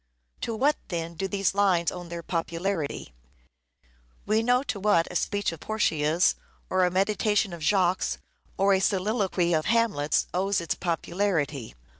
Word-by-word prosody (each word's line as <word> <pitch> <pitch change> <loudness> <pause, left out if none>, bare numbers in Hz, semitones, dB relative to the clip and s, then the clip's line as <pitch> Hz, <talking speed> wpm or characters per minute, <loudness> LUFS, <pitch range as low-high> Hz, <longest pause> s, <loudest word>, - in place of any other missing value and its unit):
To 230 - -2
what, 285 +6 +2
then, 170 -2 -4
do 195 +4 -3
these 195 -1 0
lines 190 -4 +2
owe 180 - -7
their 170 0 -7
popularity? 165 - -3 1.1
We 215 +1 +2
know 245 +3 +2
to 240 -7 -4
what 195 -5 +3
a - - -9
speech 205 +1 0
of 165 - -9
Portia's, 160 -4 +1 0.4
or 185 0 +3
a - - +2
meditation 205 +1 +1
of 170 - -8
Jacques', 185 +2 +1 0.4
or 195 +1 +4
a 190 - +3
soliloquy 190 -3 +1
of 155 -1 +1
Hamlet's, 220 -11 +2
owes 195 +2 +1
its 170 - -1
popularity. 165 - -2
185 Hz, 150 wpm, -26 LUFS, 170-205 Hz, 1.1 s, or